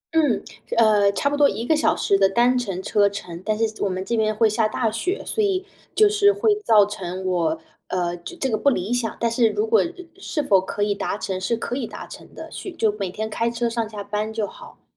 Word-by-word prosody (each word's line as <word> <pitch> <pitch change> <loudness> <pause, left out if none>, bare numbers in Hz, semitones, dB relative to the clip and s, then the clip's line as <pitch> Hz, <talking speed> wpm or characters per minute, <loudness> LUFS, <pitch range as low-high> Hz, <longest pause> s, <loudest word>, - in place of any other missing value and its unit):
嗯， 295 -7 +2 0.3
呃， 210 -3 +5
差 280 - 0
不 290 - +1
多 290 -1 +5
1 230 - -4
个 315 - +3
小 310 - +2
时 195 - +2
的 195 -1 +5
单 240 +5 +3
程 195 -7 -2
车 205 -1 +3
程， 180 -4 -7
但 215 -1 -1
是 220 -1 -2
我 200 - +1
们 185 +1 -3
这 235 - -1
边 215 -1 +1
会 225 +1 +4
下 215 +1 +1
大 225 0 -1
雪， 360 - -2
所 435 - 0
以 385 -1 0 0.3
就 430 - +6
是 410 0 +4
会 415 +1 +2
造 215 - +6
成 190 -2 -6
我， 165 -3 0 0.3
呃， 175 -1 -1
这 175 - -9
这 270 - -1
个 225 - 0
不 280 - +3
理 220 -2 -1
想。 240 -2 -1
但 235 - +1
是 230 -1 +3
如 425 - 0
果， 450 0 +4
呃， 335 - 0 0.3
是 305 -5 -2
否 195 -7 +4
可 205 +2 -3
以 205 0 +1
达 200 0 -3
成， 190 -2 -4
是 205 +5 0
可 235 - -3
以 255 -4 -3
达 - - -8
成 - - -12
的， - - -8
去 380 - -7
就 220 -9 +1
每 195 -2 -2
天 220 +4 -4
开 230 +2 -1
车 235 0 -1
上 230 -2 -2
下 210 -2 -6
班 210 +2 -3
就 220 -2 -1
好。 - - -13
220 Hz, 265 characters per minute, -23 LUFS, 200-255 Hz, 0.3 s, 就